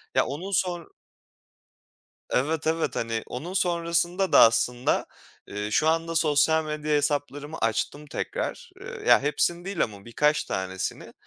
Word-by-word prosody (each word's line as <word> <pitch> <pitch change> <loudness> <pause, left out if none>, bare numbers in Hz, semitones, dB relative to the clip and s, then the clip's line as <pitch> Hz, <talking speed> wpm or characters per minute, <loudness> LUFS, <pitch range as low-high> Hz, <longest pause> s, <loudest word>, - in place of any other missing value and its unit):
Ya, - - +4
onun 170 +9 -5
sonr 175 -3 0 1.4
Evet, 150 +4 0
evet. 165 0 0
Hani, 115 -1 -2
onun 160 +9 -6
sonrasında 175 0 0
da - - +7
aslında, 120 +2 +3 0.4
ııı, 105 +1 -4
şu 155 +8 +2
anda 165 +1 0
sosyal 160 0 +3
medya 150 0 -3
hesaplarımı 145 +1 -2
açtım 115 +6 -1
tekrar. 145 - -4
Iıı, - - -8
ya - - +6
hepsini 170 +4 0
değil 195 -3 0
ama 100 -3 -7
birkaç 150 +6 +1
tanesini 95 0 -4
150 Hz, 135 wpm, -26 LUFS, 125-170 Hz, 1.4 s, da